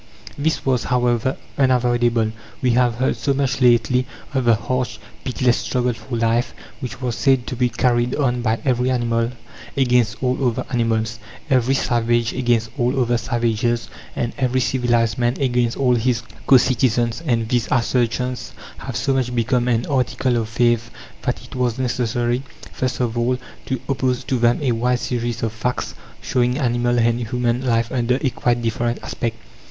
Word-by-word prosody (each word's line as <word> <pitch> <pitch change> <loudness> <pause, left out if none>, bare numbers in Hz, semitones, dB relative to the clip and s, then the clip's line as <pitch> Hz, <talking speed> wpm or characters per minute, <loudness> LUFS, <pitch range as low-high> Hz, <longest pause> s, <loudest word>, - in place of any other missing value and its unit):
This 160 +3 -1
was, 130 -3 +1
however, 125 0 +1 0.2
unavoidable. 120 -3 +2 0.3
We 125 -2 +2
have 120 -1 +3
heard 130 +3 0
so 140 -1 0
much 135 0 0
lately 125 +1 +3 0.3
of 130 -2 0
the 115 -1 +5
"harsh, 125 +3 -2 0.3
pitiless 125 -2 +1
struggle 125 -1 0
for 120 +2 -7
life," 115 +1 +1 0.2
which 125 -2 -6
was 120 -3 -1
said 125 +4 +2
to - - -4
be 125 0 +1
carried 120 0 +1
on 125 -4 0
by 115 -1 +1
every 125 -1 +2
animal 115 -2 +1 0.5
against 125 -4 +2
all 130 +1 0
other 125 0 0
animals, 115 -2 0 0.3
every 130 0 +3
"savage" 120 -2 +1
against 120 -3 +1
all 125 +3 +1
other 120 -1 +2
"savages," 115 0 0 0.3
and 120 - -2
every 130 -1 +1
civilized 120 -3 +1
man 120 0 +1
against 125 -3 +1
all 130 -2 +3
his 120 -1 +1 0.2
co 135 - +8
citizens 120 -1 +1
and 115 -7 0
these 120 -3 +1
assertions 125 0 0 0.3
have 130 -3 -6
so 135 - +1
much 125 -2 -1
become 120 +1 +1
an 120 -2 +1
article 130 -2 0
of 115 -2 -1
faith 120 -1 +1 0.3
that - - -2
it - - -12
was 125 -2 0
necessary, 120 -1 0 0.3
first 130 -1 -2
of 120 -2 -1
all, 120 +2 +1 0.3
to 130 -2 -1
oppose 130 -2 0
to 130 - -1
them 120 +4 +2
a 130 - +2
wide 125 +2 +1
series 120 -2 -2
of 115 - 0
facts 120 +3 -2 0.3
showing 125 0 +1
animal 120 -2 +1
and 115 0 +2
human 125 +1 0
life 115 -2 +1
under 125 0 +1
a 135 - +2
quite 120 0 0
different 120 +1 -1
aspect. 115 -1 -3
120 Hz, 170 wpm, -21 LUFS, 115-125 Hz, 0.5 s, co